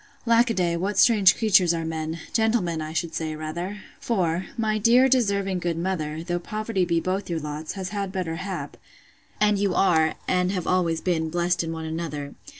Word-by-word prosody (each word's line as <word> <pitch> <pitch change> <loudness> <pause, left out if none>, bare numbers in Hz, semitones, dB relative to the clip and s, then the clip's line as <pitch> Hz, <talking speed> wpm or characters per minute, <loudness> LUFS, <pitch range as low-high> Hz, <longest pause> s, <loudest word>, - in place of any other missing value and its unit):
Lack 235 +1 +4
a 230 - 0
day, 175 -2 +1
what 195 +4 -2
strange 205 -6 +6
creatures 185 -6 +4
are 165 -1 -3
men! 160 0 -4
gentlemen, 220 -8 +1
I 155 0 -5
should 165 0 -2
say, 155 -1 -3
rather! 170 +6 -5 0.2
For, 180 -5 -1
my 215 -1 0
dear 240 +5 +5
deserving 200 -7 +1
good 170 -2 -2
mother, 165 -3 -2
though 175 0 -2
poverty 215 0 -2
be 170 -1 +1
both 185 +3 -2
your 170 -2 -1
lots, 150 +1 -5
has 190 -2 -5
had 200 -2 -3
better 180 -4 -3
hap, 190 +2 -5 0.6
and 210 -1 +3
you 195 -2 +1
are, 160 -4 +3
and 180 0 +1
have 180 -3 -2
always 170 -3 +1
been, 160 -3 0
blest 175 +1 0
in 165 - -4
one 160 -1 -5
another! 160 -3 -5
180 Hz, 190 wpm, -25 LUFS, 165-200 Hz, 0.6 s, strange